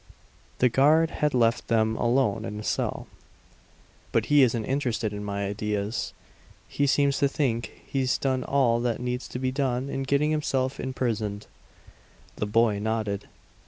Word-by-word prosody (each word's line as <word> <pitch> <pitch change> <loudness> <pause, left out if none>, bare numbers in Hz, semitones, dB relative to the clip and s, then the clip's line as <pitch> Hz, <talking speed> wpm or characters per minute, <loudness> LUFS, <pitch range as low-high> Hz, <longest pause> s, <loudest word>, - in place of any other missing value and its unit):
The 125 - +4
guard 150 +6 +4
had 150 -3 0
left 115 -1 +2
them 110 -1 +2
alone 120 -3 +1
in 105 -2 -5
the 105 - -6
cell. - - -2 1.1
"But - - +1
he 145 - +7
isn't 115 -4 +2
interested 120 -6 -1
in 105 0 -5
my 100 0 -3
ideas. 105 +1 -2 0.5
He 140 - 0
seems 140 0 +2
to 140 - +4
think 130 -5 -2
he's 130 -2 0
done 130 -2 0
all 125 -4 +2
that 120 -2 -1
needs 125 +1 -3
to - - -6
be 130 0 -1
done 135 -1 -1
in 135 - -2
getting 140 +3 +1
himself 135 -3 -1
imprisoned." 110 -5 -2 0.9
The 105 - -2
boy 110 -1 +2
nodded. 105 -2 -2
125 Hz, 155 wpm, -26 LUFS, 110-135 Hz, 1.1 s, he